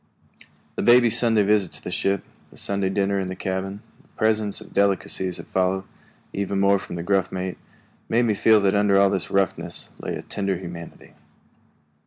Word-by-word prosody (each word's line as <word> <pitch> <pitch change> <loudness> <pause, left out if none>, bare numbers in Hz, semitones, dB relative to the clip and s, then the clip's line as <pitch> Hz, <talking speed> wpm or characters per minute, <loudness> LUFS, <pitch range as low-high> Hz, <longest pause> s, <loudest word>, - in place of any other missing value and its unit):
The - - 0
baby's 120 -1 +5
Sunday 115 -3 +3
visit 100 -3 +2
to - - -13
the - - -5
ship, 100 -1 0 0.3
the - - -18
Sunday 100 -1 -1
dinner 100 0 0
in 95 - -2
the 95 - -5
cabin, 95 +3 -4 0.2
the - - -29
presents 110 -2 0
of - - -14
delicacies 95 -2 0
that - - -9
followed, 95 0 0 0.5
even 100 0 +2
from 90 - -8
the 85 - -4
gruff 95 0 +1
mate, 95 0 -4 0.5
made 120 +2 +3
me 110 - +2
feel 110 +1 +5
that 100 -1 +2
under 100 -1 +3
all 100 -1 +4
this 95 -3 -2
roughness 95 -2 -2
lay - - -4
a - - -7
tender 100 -2 -2
humanity. 85 -2 -10
100 Hz, 180 wpm, -24 LUFS, 95-105 Hz, 0.5 s, baby's